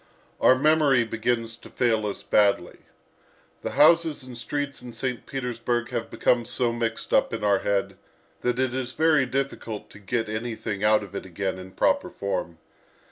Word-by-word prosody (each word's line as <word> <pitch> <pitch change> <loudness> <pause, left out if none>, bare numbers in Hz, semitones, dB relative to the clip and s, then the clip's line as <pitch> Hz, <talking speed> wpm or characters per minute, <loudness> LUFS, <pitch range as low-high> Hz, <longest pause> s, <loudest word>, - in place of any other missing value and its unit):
Our 130 - +6
memory 145 -3 +4
begins 115 0 -1
to - - -14
fail 110 -3 +1
us 100 - -5
badly. 100 -4 +2 0.8
The - - -4
houses 160 -2 +5
and 130 -1 -9
streets 145 +3 -4
in 125 -1 -9
St. 125 -1 -4
Petersburg 120 -2 -2
have 120 -2 -3
become 120 -1 +2
so 120 0 0
mixed 115 -1 -3
up - - +3
in - - -6
our 100 -2 +3
head 100 -1 -1 0.4
that 125 0 0
it 130 -1 0
is 130 -1 -3
very 155 -4 +3
difficult 130 -5 -4
to - - -13
get 115 +3 -2
anything 110 -2 -4
out 105 0 +4
of 100 - -11
it - - -4
again 95 +1 -3
in 95 0 -10
proper - - +2
form. 95 -4 -3
120 Hz, 170 wpm, -25 LUFS, 105-130 Hz, 0.8 s, Our